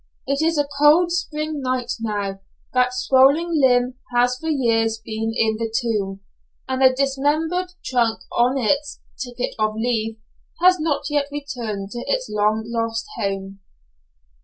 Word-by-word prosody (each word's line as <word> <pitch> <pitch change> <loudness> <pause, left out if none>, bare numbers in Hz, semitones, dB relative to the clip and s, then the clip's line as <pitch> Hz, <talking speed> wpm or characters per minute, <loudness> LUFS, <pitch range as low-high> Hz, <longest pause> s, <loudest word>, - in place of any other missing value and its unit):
It 275 +2 0
is 325 0 +2
a 290 -1 +1
cold 320 +4 +5
spring 310 -3 -2
night 255 -2 -1
now; 205 -3 -3 0.3
that 250 0 +3
swollen 275 +6 +3
limb 250 -1 +3 0.2
has 245 +1 +3
for 320 - -4
years 225 -6 +1
been 220 0 -4
in 220 -1 +2
the 225 0 -3
tomb, 210 -5 -1 0.5
and 260 0 -2
the 260 -1 +7
dismembered 295 +7 0
trunk, 235 -3 +1
on 250 +3 +2
its 280 +4 0 0.2
"Ticket 245 -1 -4
of 215 0 +1
Leave," 225 -1 -1 0.4
has 365 +1 +5
not 310 -2 0
yet 290 -1 +1
returned 235 -9 -5
to 240 - -5
its - - -1
long 210 +1 +1
lost 230 0 -2
home. 195 0 -3
250 Hz, 145 wpm, -22 LUFS, 225-290 Hz, 0.5 s, the